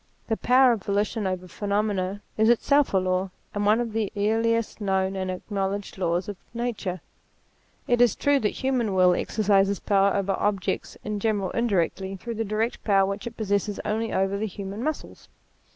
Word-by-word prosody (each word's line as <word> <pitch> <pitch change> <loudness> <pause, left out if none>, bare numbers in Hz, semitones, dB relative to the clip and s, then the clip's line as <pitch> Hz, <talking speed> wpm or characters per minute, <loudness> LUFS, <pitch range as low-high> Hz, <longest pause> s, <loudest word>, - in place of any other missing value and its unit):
The 225 - +1
power 255 +1 +5
of 225 -4 -1
volitions 205 +1 -1
over 185 -1 -3
phenomena 200 0 -1
is 220 +1 +3
itself 280 +4 +3
a 195 - +3
law, 185 0 0 0.2
and 205 0 0
one 215 +2 +4
of 235 -2 -2
the 220 -3 -1
earliest 225 +2 +1
known 190 -1 0
and 185 -1 -2
acknowledged 195 +1 -3
laws 175 0 0
of 205 -2 -5 0.2
nature. 215 -7 -3 0.9
It 240 0 +3
is 245 -4 +5
true, 285 -1 +2
the 210 - +1
human 245 -6 -1
will 180 -1 +5
exercises 200 0 +2
power 200 -1 +2
over 200 -1 0
objects 200 -3 -1
in 210 -1 -3
general 200 -3 0
indirectly, 195 -4 0
through 235 +5 -6
the 225 0 -2
direct 220 +3 -2
power 195 -2 +4
which 200 +3 -4
it 235 - -8
possesses 205 -1 -1
only 225 +2 -1
over 195 +1 0
the 220 - -1
human 200 +2 -6
muscles. 310 +1 -5
205 Hz, 175 wpm, -25 LUFS, 195-225 Hz, 0.9 s, power